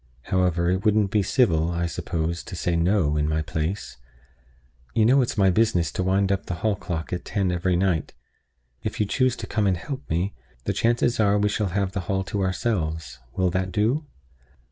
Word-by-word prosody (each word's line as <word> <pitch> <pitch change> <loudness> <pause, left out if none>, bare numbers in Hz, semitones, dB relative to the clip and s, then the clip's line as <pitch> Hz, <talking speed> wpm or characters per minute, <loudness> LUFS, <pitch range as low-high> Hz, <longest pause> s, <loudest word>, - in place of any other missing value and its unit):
However, 90 -2 +2
it 95 +1 -1
wouldn't 105 -2 +3
be 105 - +3
civil, 95 - +2
I 85 0 -1
suppose, 85 0 -2
to - - -7
say 85 0 0
'No' 85 -3 +2
in 75 0 +1
my 80 0 0
place. 80 +1 -3 1.0
You 110 -2 +4
know 135 +4 +5
it's 120 - -2
my 95 -2 +5
business 100 -4 +2
to - - -2
wind 95 +1 +2
up 100 0 -1
the 90 - -2
hall 110 -2 +3
clock 90 -3 -4
at 90 - -3
ten 95 -3 0
every 90 +1 +1
night. 90 -4 0 0.7
If 110 +2 -4
you 105 - +3
choose 130 +4 +1
to - - -6
come 105 -3 0
and 95 -2 +2
help 140 +7 -7
me, 90 +5 0 0.3
the - - -1
chances 120 +1 +1
are 100 -2 +4
that - - +3
we 105 - +3
shall 105 0 0
have 95 +1 -1
the 100 - -3
hall 95 -1 +1
to 100 +1 -3
ourselves. 85 - -2 0.2
Will 90 -1 +1
that 95 0 -1
do?" 120 +9 +1
95 Hz, 205 wpm, -24 LUFS, 85-105 Hz, 1.0 s, know